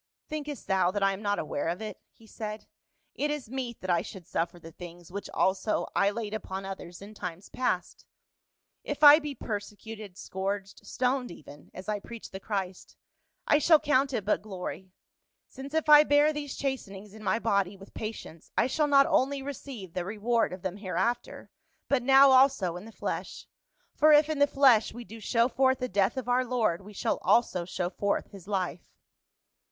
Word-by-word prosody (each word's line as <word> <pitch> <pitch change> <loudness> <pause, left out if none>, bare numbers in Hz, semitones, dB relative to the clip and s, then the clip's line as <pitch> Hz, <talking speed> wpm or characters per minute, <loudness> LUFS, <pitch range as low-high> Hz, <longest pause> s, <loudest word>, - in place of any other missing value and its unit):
" - - -64
Thinkest 300 -2 -5
thou 190 -2 +2
that 200 +1 -1
I 195 0 +3
am 195 - -7
not 205 -1 0
aware 150 -1 -3
of 170 +3 -2
it 220 -1 -7
?" - - -56
he 225 - -18
said. 215 -1 -7 0.3
" - - -47
It 295 - +2
is 295 -6 -4
meet 255 -3 -4
that 185 - -1
I 170 -1 +3
should 190 -4 -10
suffer 170 +2 -2
the 165 -1 -12
things 175 0 -11
which 200 +2 -6
also 190 +3 0
I 200 - +4
laid 210 0 -4
upon 195 -2 -5
others 190 -2 -8
in 205 +2 -11
times 180 -2 -7
past: 185 -8 -2 0.8
if 290 +1 -4
I 295 +1 +10
be 295 -3 -5
persecuted, 210 -2 -7
scourged, 195 0 -4
stoned 255 0 0
even, 145 -3 -13
as 185 +2 -10
I 210 -1 -1
preach 230 +2 -10
the 190 - -6
Christ, 190 -3 -5 0.5
I 295 - +4
shall 315 +1 +6
count 275 -1 +2
it 220 -7 -2
but 210 - +1
glory, 190 -2 -7 0.6
since 270 +1 -9
if 320 0 0
I 300 0 +9
bear 295 +1 +4
these 290 -2 -5
chastenings 210 -7 -4
in 215 0 -12
my 215 - +1
body 200 -4 0
with 195 +1 -15
patience 215 -7 -7
I - - +4
shall 295 +4 +1
not 275 -1 +6
only 275 +1 +1
receive 260 -9 -7
the 180 - -2
reward 220 +4 0
of 185 0 -8
them 190 0 -3
hereafter, 230 +5 -2 0.4
but 275 -3 +2
now 270 +2 +7
also 260 -10 +4
in 180 +3 -8
the 225 - -11
flesh; - - -5 0.5
for 310 +1 +5
if 300 0 +6
in 310 -2 -1
the 285 - +5
flesh 260 -7 +4
we 240 - -7
do 225 0 -11
show 230 +2 +2
forth 260 +1 +2
the 255 - -2
death 200 +3 +1
of 260 - -4
our 250 +1 +3
Lord 230 -8 0
we 210 +2 -12
shall - - -1
also 185 -7 +2
show 175 0 -3
forth 200 0 -1
his 195 -2 -12
life." 185 -4 -3
215 Hz, 200 wpm, -28 LUFS, 190-265 Hz, 0.8 s, I